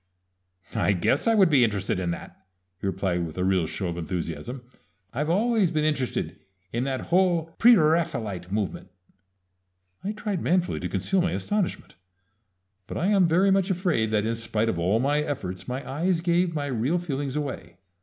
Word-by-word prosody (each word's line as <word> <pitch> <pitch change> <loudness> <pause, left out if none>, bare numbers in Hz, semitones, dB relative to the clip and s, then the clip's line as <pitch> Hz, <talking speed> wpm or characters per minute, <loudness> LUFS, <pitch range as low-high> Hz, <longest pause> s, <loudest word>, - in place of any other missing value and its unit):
"I 100 - +2
guess 100 - +1
I 225 - +4
would 190 -6 +5
be 135 -4 +5
interested 100 -5 0
in 90 -2 -1
that!" 85 +2 -7 0.3
he 100 - -3
replied 95 -2 -1
with 80 -1 -7
a 90 - 0
real 95 -3 +2
show 95 - -3
of 85 0 -4
enthusiasm. 85 - -4 0.5
"I've 150 +5 -1
always 215 +1 +2
been 155 -1 0
interested 145 -5 -1 0.3
in 120 +3 0
that 135 -1 -2
whole 170 -3 +2
Preraphaelite 155 - +3
movement!" 105 -2 -3 1.1
I 205 - -2
tried 210 -4 -3
manfully 180 0 +1
to - - -4
conceal 195 -1 0
my 175 - 0
astonishment; 205 - -2 0.9
but - - -5
I 180 - +1
am 195 -4 +4
very 185 +4 +3
much 195 0 +2
afraid 175 - +1
that 105 -1 +1
in 115 - 0
spite 115 -1 -1
of 85 - -1
all 95 +6 +2
my 145 +4 +2
efforts 95 -11 -4
my 130 +2 -4
eyes 165 +6 0
gave 170 0 +1
my 145 -1 -1
real 135 +5 0
feelings 145 -5 -3
away. 140 -11 -5
140 Hz, 175 wpm, -26 LUFS, -, 1.1 s, would